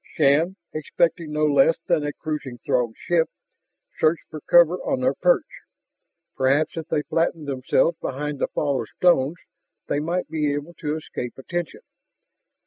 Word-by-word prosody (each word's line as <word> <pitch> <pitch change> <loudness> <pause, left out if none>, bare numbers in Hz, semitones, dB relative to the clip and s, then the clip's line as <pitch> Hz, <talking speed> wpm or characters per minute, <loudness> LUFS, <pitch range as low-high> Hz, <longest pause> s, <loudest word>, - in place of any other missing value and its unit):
Shann, 155 +5 +3 0.2
expecting 165 +1 0
no 150 0 +1
less 145 +2 +4
than 165 -4 +2
a 145 - -1
cruising 150 -6 -5
Throg 120 -3 0
ship, 170 -2 +1 0.7
searched 155 +1 +2
for 155 -1 -7
cover 175 +2 +5
on 265 +6 -2
their 260 - +2
perch. - - +3 0.9
Perhaps 140 +3 +2
if 160 -2 -5
they 150 - 0
flattened 165 -1 -1
themselves 140 +5 +1
behind 145 +1 -4
the - - +1
fall 140 -3 -1
of - - -7
stones, 170 -3 +3 0.5
they 145 - -1
might 170 +4 -2
be 150 -2 0
able 145 +4 -6
to 150 0 -2
escape 125 -5 -6
attention. 175 - -4
155 Hz, 150 wpm, -23 LUFS, 140-170 Hz, 0.9 s, cover